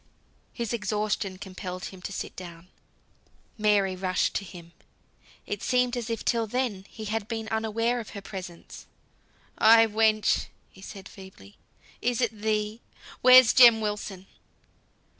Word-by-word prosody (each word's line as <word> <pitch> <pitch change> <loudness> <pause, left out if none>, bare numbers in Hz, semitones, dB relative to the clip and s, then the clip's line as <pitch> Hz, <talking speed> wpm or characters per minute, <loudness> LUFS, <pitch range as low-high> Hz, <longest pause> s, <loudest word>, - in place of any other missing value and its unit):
His 235 -2 -4
exhaustion 210 -3 -2
compelled 185 -1 -7
him 185 - -13
to 200 - -6
sit - - -6
down. 175 -1 -11 0.9
Mary 205 -3 +2
rushed 185 -1 0
to - - -2
him. 170 -3 -12 0.7
It 205 - -5
seemed 250 -1 +1
as 240 -2 -4
if 230 - -4
till 230 -1 +1
then 215 -5 -3
he 220 - -9
had 215 0 -3
been 225 -1 -4
unaware 225 +2 -1
of 225 - -8
her - - -6
presence. 180 -4 -9 0.7
"Ay, 225 +1 +7
ay, - - +2
wench!" 215 -1 +2 0.3
said 195 -1 -10
he - - -16
feebly, 190 - -14 0.4
"is 245 -1 0
it 240 -3 +1
thee? 215 +1 -2 0.4
Where's 255 -1 +8
Jem 240 -3 +8
Wilson?" 205 -3 -4
210 Hz, 140 wpm, -27 LUFS, 190-230 Hz, 0.9 s, Where's